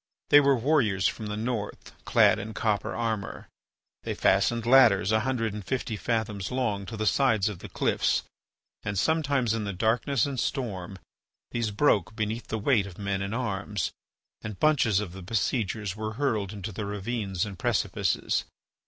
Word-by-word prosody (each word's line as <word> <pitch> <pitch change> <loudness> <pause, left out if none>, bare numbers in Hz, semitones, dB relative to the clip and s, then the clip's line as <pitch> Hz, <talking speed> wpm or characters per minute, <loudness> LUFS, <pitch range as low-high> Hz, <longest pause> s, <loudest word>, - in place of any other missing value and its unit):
They 145 - +10
were 140 -2 +4
warriors 115 -8 +2
from 110 - -4
the 105 0 -4
North, 110 -2 -4
clad - - +4
in 110 +2 -6
copper 105 -2 -1
armour. 110 -4 -3 0.5
They - - -4
fastened 115 +3 +2
ladders 115 -6 +6
a 110 - +4
hundred 115 -3 -1
and 105 -1 -6
fifty 125 -1 -2
fathoms 105 -3 -2
long 110 -7 -1
to 110 - -6
the 110 - -1
sides 110 -4 +3
of 100 -5 -7
the - - -9
cliffs - - +1 0.6
and 100 0 -3
sometimes 140 - +1
in 115 -1 -2
the 100 -1 -3
darkness 115 +6 +1
and 140 -3 -3
storm 100 -10 -3 0.5
these 115 -2 -1
broke 105 - +2
beneath 110 +1 -3
the 110 - -2
weight 105 -2 +2
of 90 - -11
men 100 -1 -2
and 100 +3 -3
arms, 100 -6 -2 0.5
and 105 -3 -7
bunches 125 -10 +3
of 100 -5 -5
the 95 - -8
besiegers 105 0 -1
were 110 0 -4
hurled 110 -7 -1
into 105 0 -6
the 100 +1 -5
ravines 100 -2 -2
and 100 -4 -8
precipices. - - 0
110 Hz, 170 wpm, -27 LUFS, 100-120 Hz, 0.6 s, They